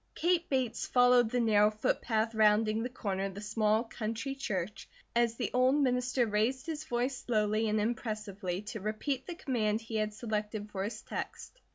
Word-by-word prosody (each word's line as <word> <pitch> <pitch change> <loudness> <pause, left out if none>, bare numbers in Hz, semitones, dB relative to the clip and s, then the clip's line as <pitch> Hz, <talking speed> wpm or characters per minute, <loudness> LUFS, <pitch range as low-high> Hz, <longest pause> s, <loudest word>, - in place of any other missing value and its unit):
Kate 345 0 +1
Bates 260 -4 0
followed 245 -2 +5
the 250 +1 0
narrow 210 -2 +5
footpath 220 +1 0
rounding 215 0 +3
the 245 - -2
corner 195 -6 -2
of 195 -1 -5
the 205 - -6
small 215 +1 +1
country 230 +3 -4
church, 210 -8 -4 0.3
as 235 -1 +3
the - - -2
old 255 +2 +4
minister 250 -3 +2
raised 225 +5 0
his 310 -2 -4
voice 245 +1 -1
slowly 215 -2 +1
and 215 0 +1
impressively 210 -4 -3
to 215 +1 -6
repeat 230 +6 -2
the 350 - -5
command 225 - 0
he 225 -1 -4
had 215 0 0
selected 210 -1 -4
for 190 -1 -2
his 215 +2 -5
text. - - -6
225 Hz, 175 wpm, -31 LUFS, 210-250 Hz, 0.3 s, followed